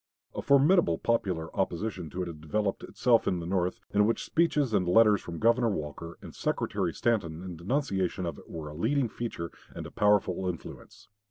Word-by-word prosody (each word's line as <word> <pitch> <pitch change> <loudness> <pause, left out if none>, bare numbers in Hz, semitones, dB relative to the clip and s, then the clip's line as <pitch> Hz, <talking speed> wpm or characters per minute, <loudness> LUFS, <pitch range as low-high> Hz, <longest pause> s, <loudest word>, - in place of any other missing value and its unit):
A - - -4
formidable 140 - +4
popular 95 -9 -1
opposition 95 -2 -2
to 90 +1 -3
it - - -5
had 80 -3 -8
developed 100 +6 -1
itself 120 -2 +2
in 90 - +1
the 85 - -5
North, 90 0 -1
in 105 +1 +4
which 115 - 0
speeches 150 -7 +1
and 90 -3 +2
letters 105 +2 +5
from 85 -1 -7
Governor 115 +3 +3
Walker 85 -2 -5
and - - -9
Secretary - - -1
Stanton 90 -8 -1
in 90 -2 -6
denunciation 95 - -1
of 85 - -4
it - - -17
were 80 -2 -6
a - - -9
leading 130 - +1
feature 105 -8 -5 0.2
and - - -6
a - - -9
powerful 100 -3 +2
influence. 85 -5 -9
95 Hz, 185 wpm, -29 LUFS, 85-115 Hz, 0.2 s, letters